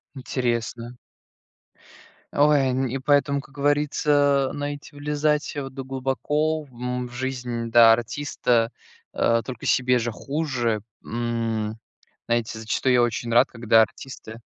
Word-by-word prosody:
Интересно. 120 -2 -3 1.4
Ой, 145 0 +4
н 130 +1 0
и 130 +2 -3
поэтому, 140 +1 +2
как 135 - -13
говорится, 145 -1 +2
знаете, 145 0 -6
влезать, 150 +1 -1
э, 145 - -2
в - - -5
это 135 0 -7
глубоко 150 +4 -1
в, 140 - -19
м, 125 +1 -3
в - - -14
жизнь, 120 -2 -3
да, 115 -1 +8
артиста, 120 -1 0 0.4
э, 115 0 +2
только 125 -4 -7
себе 125 -1 +3
же 120 0 -2
хуже, 125 -4 -2 0.2
м, 115 -2 -2 0.5
знаете, 120 -1 -1
зачастую 115 +3 0
я 125 - +5
очень 120 0 -1
рад, 120 - +5
когда 115 -1 +3
артисты 110 -1 -8
125 Hz, 130 wpm, -24 LUFS, 115-145 Hz, 1.4 s, да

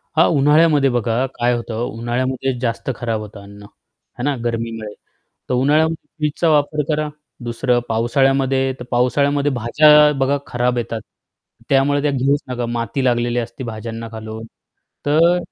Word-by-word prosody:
हां, 160 - +5
उन्हाळ्यामध्ये 150 -1 +4
बघा 120 +1 0
काय 120 +1 +1
होतं? 115 -1 -5
उन्हाळ्यामध्ये 125 +3 -2
जास्त 120 +1 -3
खराब 115 -2 -2
होतं 105 -1 -10
अन्न, 100 +1 -13
आहे 120 +4 -14
ना 145 0 +1
गर्मीमुळे, 115 -2 -3 0.6
तर - - 0
उन्हाळ्यामध्ये 150 +4 +1
फ्रिजचा 155 +2 0
वापर 150 0 +2
करा. 150 0 0 0.3
दुसरं 120 +1 0
पावसाळ्यामध्ये 135 +3 +1
तर - - -6
पावसाळ्यामध्ये 140 +4 +2
भाज्या 150 +5 +5
बघा 135 +2 +2
खराब 125 0 0
येतात, 115 -2 -3 0.7
त्यामुळे 140 +1 +3
त्या 145 - +1
घेऊच 140 +2 +1
नका, 125 -1 -2
माती 120 +2 -2
लागलेली 120 -1 +1
असती 120 +2 -6
भाज्यांना 115 0 -6
खालून. 110 0 -7 0.6
तर 165 +4 +4
125 Hz, 140 wpm, -19 LUFS, 115-145 Hz, 0.7 s, हां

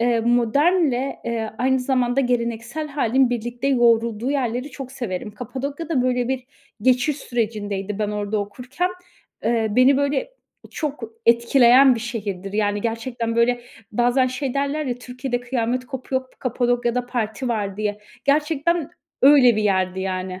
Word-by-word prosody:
eee, 235 -1 +2
modernle, 265 +4 +2
eee, 225 -2 -2
aynı 260 +1 +2
zamanda 250 0 +1
geleneksel 240 +3 -2
hâlin 265 -3 +2
birlikte 240 +2 -3
yoğurulduğu 235 -2 +2
yerleri 255 0 -1
çok 265 -1 -8
severim. 210 -6 -4
Kapadokya 270 +8 -6
da 290 -7 +1
böyle 250 -1 0
bir 260 -1 -2 0.4
geçiş 255 +4 +3
sürecindeydi 210 -5 -3
ben 210 -1 -1
orada 210 0 -2
okurken. 250 - -3 0.5
Eee 225 0 +2
beni 255 +5 +5
böyle 285 - 0 0.4
çok 295 -5 -4 0.2
etkileyen 245 +2 +6
bir 230 - -4
şehirdir. 200 -5 -5
Yani, 205 -1 0
gerçekten, 230 0 -3
böyle, 240 +1 +3 0.3
bazen 245 +3 +3
şey 255 +1 -3
derler 280 +2 -1
ya 245 - -1
"Türkiye'de 250 0 -4
kıyamet 245 0 -2
kopuyor, 260 0 -3
Kapadokya'da 245 0 0
parti 235 0 -3
var." 205 -4 -2
diye. 210 -1 -2 0.3
Gerçekten, 300 +2 +1 0.3
öyle 265 -5 +7
bir 215 - +1
yerdi 190 -2 +1
yani. 185 -1 -3
245 Hz, 140 wpm, -22 LUFS, 225-265 Hz, 0.5 s, öyle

